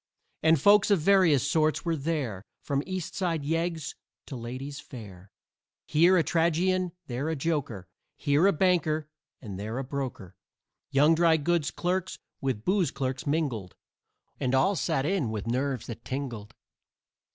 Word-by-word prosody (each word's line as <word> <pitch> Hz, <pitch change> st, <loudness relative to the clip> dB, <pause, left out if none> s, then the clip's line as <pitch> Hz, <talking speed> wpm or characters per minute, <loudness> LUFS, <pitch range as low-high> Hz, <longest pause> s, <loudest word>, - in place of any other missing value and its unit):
And 160 Hz, -1 st, +4 dB
folks 205 Hz, +6 st, +5 dB
of 200 Hz, -3 st, +4 dB
various 165 Hz, -6 st, +4 dB
sorts 155 Hz, +2 st, +1 dB
were 165 Hz, -1 st, +1 dB
there 140 Hz, -, -2 dB, 0.2 s
From 140 Hz, -1 st, 0 dB
East 185 Hz, -3 st, -4 dB
Side 170 Hz, -5 st, -1 dB
yeggs 165 Hz, 0 st, -1 dB, 0.3 s
to 135 Hz, -, -7 dB
ladies 130 Hz, +4 st, -6 dB
fair; 100 Hz, -7 st, -11 dB, 0.5 s
Here 175 Hz, +5 st, +4 dB
a 165 Hz, -, +4 dB
tragedian, 175 Hz, +2 st, +1 dB
there 130 Hz, +5 st, -3 dB
a 160 Hz, -, -1 dB
joker, 135 Hz, -, -2 dB, 0.3 s
Here 145 Hz, +6 st, +3 dB
a -, -, +5 dB
banker 160 Hz, -4 st, +1 dB, 0.4 s
and 100 Hz, -4 st, -6 dB
there 110 Hz, +4 st, -4 dB
a 135 Hz, -, -2 dB
broker. 125 Hz, -, -5 dB, 0.5 s
Young 145 Hz, +4 st, +5 dB
dry 165 Hz, -1 st, +4 dB
goods 160 Hz, -2 st, +1 dB
clerks 180 Hz, +7 st, -2 dB, 0.2 s
with 130 Hz, -6 st, -2 dB
booze 190 Hz, -2 st, +2 dB
clerks 130 Hz, 0 st, -3 dB
mingled, 135 Hz, -, -1 dB, 0.6 s
And 130 Hz, 0 st, +1 dB
all 140 Hz, +10 st, +3 dB
sat 135 Hz, -5 st, 0 dB
in 175 Hz, -, 0 dB
with 110 Hz, -2 st, -4 dB
nerves 130 Hz, +1 st, -1 dB
that 115 Hz, -1 st, -8 dB
tingled. 125 Hz, -6 st, -5 dB
145 Hz, 150 wpm, -28 LUFS, 130-170 Hz, 0.6 s, folks